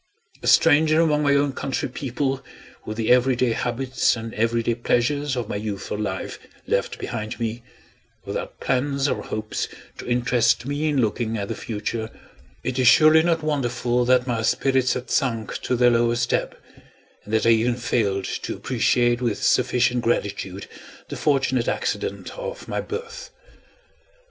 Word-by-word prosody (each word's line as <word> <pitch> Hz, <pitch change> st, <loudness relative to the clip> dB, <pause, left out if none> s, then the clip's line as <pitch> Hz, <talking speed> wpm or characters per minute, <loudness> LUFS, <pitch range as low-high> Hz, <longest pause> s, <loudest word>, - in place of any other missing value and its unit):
A -, -, -5 dB
stranger 155 Hz, 0 st, +5 dB
among 155 Hz, -3 st, +3 dB
my 140 Hz, -1 st, +3 dB
own 140 Hz, -1 st, +2 dB
country 130 Hz, -2 st, -2 dB
people, 135 Hz, +1 st, -3 dB, 0.4 s
with 110 Hz, 0 st, -5 dB
the 115 Hz, 0 st, +1 dB
every 125 Hz, +1 st, +4 dB
day 125 Hz, 0 st, +1 dB
habits 125 Hz, +3 st, 0 dB
and 115 Hz, 0 st, -7 dB
every 115 Hz, +1 st, 0 dB
day 120 Hz, -, +1 dB
pleasures 130 Hz, +4 st, 0 dB
of 120 Hz, -3 st, -2 dB
my 100 Hz, -, -3 dB
youthful 105 Hz, -1 st, -4 dB
life 95 Hz, -3 st, -4 dB, 0.3 s
left -, -, -1 dB
behind 110 Hz, -1 st, -5 dB
me 115 Hz, +1 st, -3 dB, 0.6 s
without -, -, -5 dB
plans 140 Hz, +2 st, 0 dB
or -, -, -1 dB
hopes 110 Hz, 0 st, -4 dB, 0.3 s
to -, -, -8 dB
interest 120 Hz, -1 st, +2 dB
me 145 Hz, +3 st, -1 dB
in 145 Hz, -2 st, +1 dB
looking 110 Hz, 0 st, -1 dB
at 100 Hz, -1 st, -4 dB
the -, -, -2 dB
future 110 Hz, +1 st, -4 dB, 0.5 s
it 130 Hz, 0 st, -2 dB
is 125 Hz, -, +3 dB
surely 155 Hz, +4 st, +7 dB
not 165 Hz, -1 st, +1 dB
wonderful 125 Hz, -4 st, 0 dB
that 125 Hz, 0 st, +3 dB
my 120 Hz, -3 st, -1 dB
spirits 130 Hz, +2 st, +2 dB
had 125 Hz, 0 st, -6 dB
sunk 115 Hz, -5 st, 0 dB
to 125 Hz, -, 0 dB
their 120 Hz, 0 st, +4 dB
lowest 120 Hz, 0 st, +1 dB
ebb, -, -, -1 dB, 0.7 s
and 105 Hz, -, -11 dB
that 110 Hz, 0 st, +2 dB
I -, -, +5 dB
even 115 Hz, +2 st, +3 dB
failed 100 Hz, -5 st, 0 dB
to -, -, -4 dB
appreciate 120 Hz, 0 st, +1 dB
with 115 Hz, -4 st, -1 dB
sufficient 125 Hz, -1 st, +2 dB
gratitude 100 Hz, -4 st, -2 dB, 0.4 s
the -, -, -5 dB
fortunate 130 Hz, -4 st, +1 dB
accident -, -, -2 dB
of -, -, -6 dB
my -, -, -2 dB
birth. 470 Hz, +3 st, -7 dB
125 Hz, 160 wpm, -23 LUFS, 115-135 Hz, 0.7 s, surely